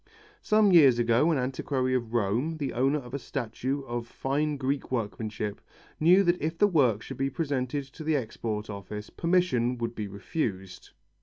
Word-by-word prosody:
Some 215 Hz, -2 st, +4 dB
years 140 Hz, -9 st, +7 dB
ago 120 Hz, +6 st, +3 dB
an 160 Hz, -, +2 dB
antiquary 130 Hz, 0 st, -1 dB
of 120 Hz, -3 st, -1 dB
Rome, 120 Hz, +9 st, 0 dB
the 140 Hz, -3 st, -3 dB
owner 135 Hz, +5 st, +2 dB
of 125 Hz, -3 st, -9 dB
a 140 Hz, -, -2 dB
statue 130 Hz, +2 st, -3 dB
of 120 Hz, -2 st, -4 dB
fine 145 Hz, +4 st, -1 dB
Greek 135 Hz, 0 st, -2 dB
workmanship, 110 Hz, -3 st, -3 dB, 0.4 s
knew 180 Hz, +5 st, +6 dB
that 175 Hz, -1 st, +1 dB
if 160 Hz, +2 st, -2 dB
the 205 Hz, -, +5 dB
work 130 Hz, -, +2 dB
should -, -, -8 dB
be 135 Hz, 0 st, 0 dB
presented 140 Hz, -2 st, -2 dB
to 160 Hz, -, -8 dB
the 155 Hz, 0 st, +1 dB
Export 110 Hz, -4 st, -3 dB
Office, 105 Hz, +1 st, -7 dB
permission 165 Hz, -9 st, +1 dB
would 115 Hz, 0 st, -3 dB
be 105 Hz, -3 st, -4 dB
refused. 100 Hz, -, -4 dB
130 Hz, 170 wpm, -28 LUFS, 115-150 Hz, 0.4 s, years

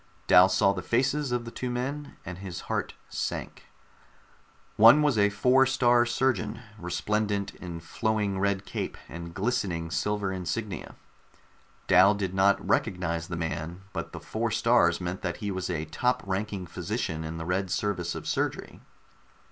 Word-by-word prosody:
Dal 90 Hz, +1 st, +7 dB
saw 100 Hz, 0 st, +3 dB
the 95 Hz, -, -4 dB
faces 135 Hz, +5 st, 0 dB
of 120 Hz, -1 st, -1 dB
the 115 Hz, -, -7 dB
two 125 Hz, -, -4 dB
men, 140 Hz, +4 st, -4 dB
and 90 Hz, 0 st, -7 dB
his 90 Hz, -3 st, -6 dB
heart -, -, -3 dB
sank. -, -, -4 dB, 1.1 s
One 120 Hz, +8 st, +8 dB
was 145 Hz, -4 st, +3 dB
a 105 Hz, -1 st, +4 dB
Four 125 Hz, +6 st, +4 dB
star 120 Hz, -2 st, +4 dB
Surgeon, 130 Hz, +2 st, 0 dB, 0.2 s
resplendent 100 Hz, +3 st, -1 dB
in 85 Hz, -2 st, -7 dB
flowing 105 Hz, +2 st, -1 dB
red 100 Hz, 0 st, 0 dB
cape -, -, -4 dB
and 85 Hz, 0 st, -8 dB
glistening 95 Hz, -5 st, -1 dB
silver 100 Hz, +6 st, -1 dB
insignia. 95 Hz, +3 st, -4 dB, 0.9 s
Dal 95 Hz, +3 st, +6 dB
did 95 Hz, -2 st, -3 dB
not 95 Hz, +1 st, +3 dB
recognize 85 Hz, -2 st, 0 dB
the 85 Hz, -, -4 dB
man, 80 Hz, +2 st, -4 dB
but -, -, -4 dB
the -, -, -7 dB
four 115 Hz, +1 st, -2 dB
stars 115 Hz, +2 st, +3 dB
meant 90 Hz, +1 st, -4 dB
that 90 Hz, -2 st, -3 dB
he 105 Hz, -1 st, -3 dB
was 95 Hz, -1 st, -3 dB
a 80 Hz, -3 st, -2 dB
top 125 Hz, +10 st, 0 dB
ranking 95 Hz, 0 st, -3 dB
physician 80 Hz, -1 st, -3 dB
in 80 Hz, +1 st, -5 dB
the 80 Hz, -, -5 dB
Red 95 Hz, +2 st, -1 dB
Service 90 Hz, -3 st, -1 dB
of -, -, -6 dB
Surgery. -, -, -2 dB
100 Hz, 155 wpm, -28 LUFS, 90-115 Hz, 1.1 s, One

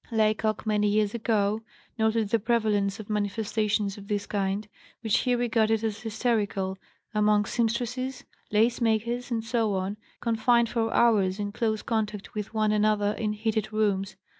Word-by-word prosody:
Laycock, 215 Hz, -1 st, +1 dB
many 210 Hz, -1 st, +2 dB
years 210 Hz, 0 st, +2 dB
ago, 215 Hz, -2 st, +1 dB, 0.3 s
noted 220 Hz, -1 st, +1 dB
the 230 Hz, -, +2 dB
prevalence 215 Hz, -2 st, +1 dB
of 215 Hz, -, -8 dB
manifestations 210 Hz, 0 st, -1 dB
of 200 Hz, -, -12 dB
this 205 Hz, -1 st, -1 dB
kind, 195 Hz, 0 st, -2 dB, 0.3 s
which 220 Hz, -3 st, +2 dB
he 250 Hz, -1 st, +1 dB
regarded 225 Hz, -2 st, +1 dB
as 220 Hz, -1 st, -2 dB
hysterical, 210 Hz, -4 st, -1 dB, 0.4 s
among 210 Hz, -1 st, +3 dB
seamstresses, 245 Hz, +4 st, -1 dB, 0.3 s
lace 225 Hz, +4 st, +2 dB
makers, 235 Hz, +2 st, 0 dB
etc., 220 Hz, -4 st, 0 dB, 0.2 s
confined 235 Hz, 0 st, +2 dB
for 225 Hz, -1 st, 0 dB
hours 205 Hz, -5 st, +3 dB
in 205 Hz, -1 st, -3 dB
close 220 Hz, -1 st, -1 dB
contact 215 Hz, -3 st, -2 dB
with 210 Hz, -1 st, -4 dB
one 215 Hz, -1 st, +1 dB
another 210 Hz, -1 st, +2 dB
in 215 Hz, -2 st, 0 dB
heated 220 Hz, 0 st, -1 dB
rooms. 200 Hz, -3 st, 0 dB
215 Hz, 140 wpm, -27 LUFS, 205-225 Hz, 0.4 s, among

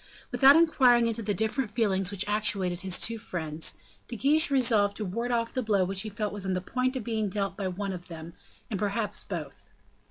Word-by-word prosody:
Without 275 Hz, +1 st, +7 dB
inquiring 260 Hz, -8 st, +4 dB
into 230 Hz, 0 st, -1 dB
the 205 Hz, -2 st, -2 dB
different 220 Hz, +4 st, -1 dB
feelings 195 Hz, -4 st, 0 dB
which 200 Hz, 0 st, -2 dB
actuated 200 Hz, -4 st, 0 dB
his 190 Hz, -2 st, 0 dB
two 230 Hz, 0 st, 0 dB
friends, 160 Hz, -7 st, -2 dB, 0.3 s
De 240 Hz, -, -6 dB
Guiche 295 Hz, -, +3 dB
resolved 225 Hz, -7 st, +2 dB
to 215 Hz, -, -4 dB
ward 230 Hz, +6 st, -3 dB
off 230 Hz, -1 st, -1 dB
the 255 Hz, -, -1 dB
blow 210 Hz, -5 st, +1 dB
which 190 Hz, +1 st, -2 dB
he 215 Hz, -, -5 dB
felt 210 Hz, 0 st, -4 dB
was 205 Hz, -2 st, -4 dB
on 190 Hz, -1 st, -1 dB
the 185 Hz, -, 0 dB
point 255 Hz, +7 st, -2 dB
of 255 Hz, -, -3 dB
being 220 Hz, -2 st, -2 dB
dealt 195 Hz, 0 st, -2 dB
by 195 Hz, -2 st, -3 dB
one 195 Hz, +1 st, -4 dB
of 180 Hz, -1 st, -8 dB
them, 165 Hz, 0 st, -9 dB, 0.3 s
and 205 Hz, -, -4 dB
perhaps 210 Hz, +1 st, -1 dB
by -, -, -4 dB
both. -, -, -19 dB
210 Hz, 220 wpm, -27 LUFS, 190-235 Hz, 0.3 s, Without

